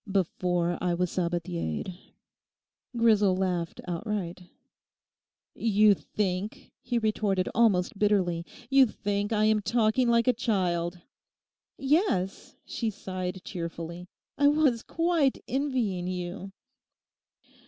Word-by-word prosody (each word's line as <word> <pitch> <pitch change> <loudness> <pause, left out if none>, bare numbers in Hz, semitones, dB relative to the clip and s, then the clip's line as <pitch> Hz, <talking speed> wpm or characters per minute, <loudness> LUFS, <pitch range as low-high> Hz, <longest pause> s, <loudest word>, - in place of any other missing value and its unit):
'Before, 175 -2 0
I 175 -1 +1
was 180 0 -1
Sabathiered.' 175 - -2 1.0
Grisel 210 -5 +4
laughed 180 -3 -2
outright. 180 0 -3 1.1
'You 210 -2 +4
think,' 195 +1 -3
he 240 -1 -1
retorted 210 -4 0
almost 200 -4 +2
bitterly, 185 -5 +2 0.2
'you 270 0 +6
think 205 0 -2
I 215 -1 +2
am 215 -1 +3
talking 230 +3 +2
like 235 +1 +3
a 250 - +5
child.' 180 -6 -1 0.8
'Yes,' 270 - 0
she 230 - -2
sighed 185 -3 -5
cheerfully, 170 0 -6 0.3
'I 285 - +5
was 290 -6 +3
quite 330 -4 +1
envying 245 -10 -1
you. 180 +2 -5
200 Hz, 100 wpm, -28 LUFS, 180-230 Hz, 1.1 s, you